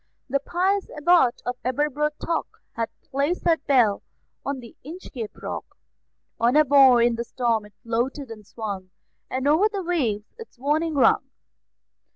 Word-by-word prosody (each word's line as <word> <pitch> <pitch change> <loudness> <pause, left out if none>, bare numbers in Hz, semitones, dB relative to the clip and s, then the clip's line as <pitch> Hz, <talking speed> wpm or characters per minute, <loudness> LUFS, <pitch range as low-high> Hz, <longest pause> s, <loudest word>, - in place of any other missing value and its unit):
The 275 +2 +1
pious 375 +7 0
Abbot 300 -5 +3
of 245 0 -2
Aberbrothock 300 +5 -1 0.2
Had 230 -1 -3
placed 285 +6 -1
that 330 -2 +1
bell 240 -7 +4 0.4
on 280 -1 -3
the 235 -2 -12
Inchcape 275 - -8
Rock; - - -6 0.6
On 240 +3 +3
a 305 0 +6
buoy 265 -4 +6
in 235 -1 +1
the 235 - -2
storm 235 -3 -1
it 210 - -23
floated 240 +3 -2
and 215 -1 -9
swung, 200 -3 -6 0.4
And 260 +2 -1
over 330 +9 +4
the 400 -3 -3
waves 245 -12 -1
its 455 - -11
warning 305 +5 0
rung. 275 - +3
270 Hz, 150 wpm, -24 LUFS, 235-305 Hz, 0.6 s, a